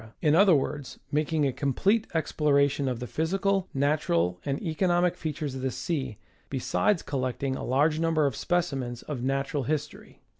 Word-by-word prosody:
in 150 -3 +3
other 185 0 +6
words, 145 0 -3
mak 150 +1 0
ing 155 -2 +2
a 135 - 0
complete 195 - +1
exploration 140 -3 +2
of 125 -3 -2
the 125 - -4
physical, 190 +6 0
natural 90 - +1
and 140 -1 -2
economic 175 +1 +1
features 150 -3 -4
of 130 - -5
the 130 - 0
sea, 130 - -3 0.3
besides 165 +8 +1
collecting 130 0 -2
a - - -5
large 150 +5 +2
number 165 -2 +2
of 135 -5 0
specimens 135 -9 -1
of 140 -5 -5
natural 135 +2 -1
history. 150 +3 -4
145 Hz, 160 wpm, -27 LUFS, 135-165 Hz, 0.3 s, other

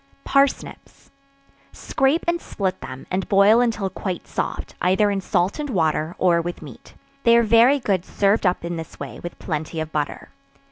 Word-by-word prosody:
Parsnips. 275 0 -1 0.6
Scrape 270 +5 0
and 345 0 0
split 190 -2 -3
them, 130 0 -8
and 185 +1 -2
boil 205 +4 +5
until 225 -5 0
quite 185 -1 -5
soft, - - -4
either 190 +3 +3
in 195 -1 -1
salt 185 - 0
and 295 -1 -3
water, 160 -4 0
or 175 -2 +3
with 175 0 -6
meat; 140 -6 -13 0.3
they 235 -2 +5
are 235 - +4
very 230 +5 +5
good 195 -7 0
served 200 +1 +1
up 180 -1 -1
in 170 0 -4
this 160 - -9
way, - - -7
with 175 - -8
plenty 160 0 -4
of 160 0 -4
butter. 150 -2 -3
190 Hz, 175 wpm, -22 LUFS, 170-230 Hz, 0.6 s, boil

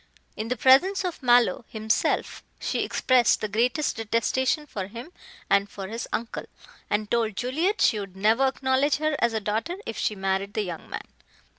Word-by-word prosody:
In 215 - -4
the 250 +2 -2
presence 365 - +4
of 355 -4 -4
Mallow 240 -5 +4
himself, 220 0 -1 0.2
she - - -2
expressed 250 -4 +3
the 215 - -2
greatest 245 +8 0
detestation 235 +6 0
for 195 -9 -5
him 235 - -9 0.4
and 200 0 +2
for 195 -1 -7
his 230 +2 -5
uncle, 230 0 -3 0.4
and 210 0 -1
told 225 -3 +1
Juliet 315 - 0
she 215 - +4
would 195 -2 -7
never 225 +7 +3
acknowledge 265 +2 +1
her 310 0 0
as 235 -1 +2
a 220 - 0
daughter 220 - -2
if 225 - -5
she 210 - 0
married 195 +1 -2
the 215 - +1
young 175 -4 -7
man. - - -6
230 Hz, 175 wpm, -26 LUFS, 210-260 Hz, 0.4 s, presence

